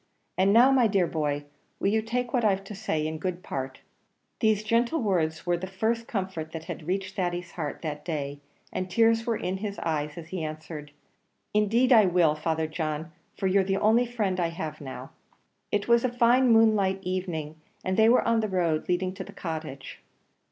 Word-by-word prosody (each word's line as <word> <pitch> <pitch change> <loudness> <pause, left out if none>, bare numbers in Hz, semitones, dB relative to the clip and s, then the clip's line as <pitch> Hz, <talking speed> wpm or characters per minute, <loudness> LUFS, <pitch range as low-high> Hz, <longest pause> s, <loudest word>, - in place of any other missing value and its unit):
And 190 +2 +3
now, 240 +5 +7
my 255 -4 +5
dear 195 -4 +2
boy, 145 -3 -2 0.3
will 195 - +2
you 220 +2 +2
take 240 +2 -2
what 245 -3 +2
I've 195 -2 +2
to 195 - -8
say 185 -7 -2
in 155 0 -3
good 180 +1 -3
part?" 130 0 -5 0.6
These 215 -2 +2
gentle 235 +8 +1
words 170 -8 0
were 175 -1 +1
the 185 +2 -5
first 225 +5 -1
comfort 185 -6 -4
that 160 -1 -5
had 155 - -7
reached 190 +1 -2
Thady's 175 -2 -2
heart 150 -3 -5
that 150 -2 -4
day, 145 -4 -4 0.3
and 185 0 -3
tears 225 +4 +3
were 230 -2 +1
in 185 +1 -2
his 200 0 -5
eyes 150 -2 -2
as 165 -1 -8
he 180 -2 -4
answered, 155 -1 -6 0.6
"Indeed 225 +5 +3
I 215 -4 +7
will, 175 -4 +4
Father 160 +1 -1
John, 155 0 -3 0.3
for - - -3
you're 190 +1 +4
the 195 +1 0
only 225 +4 +3
friend 210 -6 -1
I 170 - +2
have 160 -2 -6
now." 135 -2 -8 0.6
It 205 -1 0
was 235 0 +4
a 255 - +2
fine 245 +1 +4
moonlight 210 -4 +4
evening, 175 -4 -3 0.3
and 185 - 0
they 220 +2 +5
were 245 - +4
on 230 0 +3
the 215 -1 -1
road 170 -4 0
leading 185 +1 0
to - - -6
the - - -11
Cottage. 155 -7 -6
185 Hz, 195 wpm, -27 LUFS, 160-220 Hz, 0.6 s, now